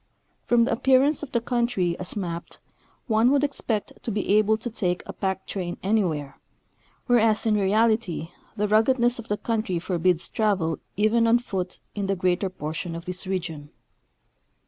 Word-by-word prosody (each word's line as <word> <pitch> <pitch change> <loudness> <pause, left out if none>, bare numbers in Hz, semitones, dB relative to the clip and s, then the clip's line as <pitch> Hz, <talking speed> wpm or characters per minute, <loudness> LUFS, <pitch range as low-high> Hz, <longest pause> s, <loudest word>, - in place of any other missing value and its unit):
From 240 -1 +4
the 245 - 0
appearance 265 +4 +3
of 295 - -7
the 235 - +2
country 235 -7 0
as 185 - -3
mapped 170 -4 -5 0.5
one 225 +1 +3
would 280 +1 +3
expect 235 -7 -2
to - - -5
be 205 -2 -2
able 215 +1 +4
to 235 +2 -5
take 180 -5 -1
a - - -7
jjack 190 -1 -2
train 180 -3 -4
anywhere, 175 -9 0 0.7
whereas 225 -4 +3
in 220 - +3
reality 210 -4 +1 0.3
the 210 +1 +1
ruggedness 240 +3 +3
of 230 - -8
the 210 - -1
country 215 -6 -1
forbids 175 0 0
travel 190 -7 0 0.2
even 225 +2 +3
on 230 +1 +5
foot 190 -7 -4
in 200 -2 -3
the 195 - +1
greater 185 +1 0
portion 165 -1 -5
of 170 +1 -7
this 180 +1 -5
region. 165 -6 -4
210 Hz, 165 wpm, -25 LUFS, 180-230 Hz, 0.7 s, on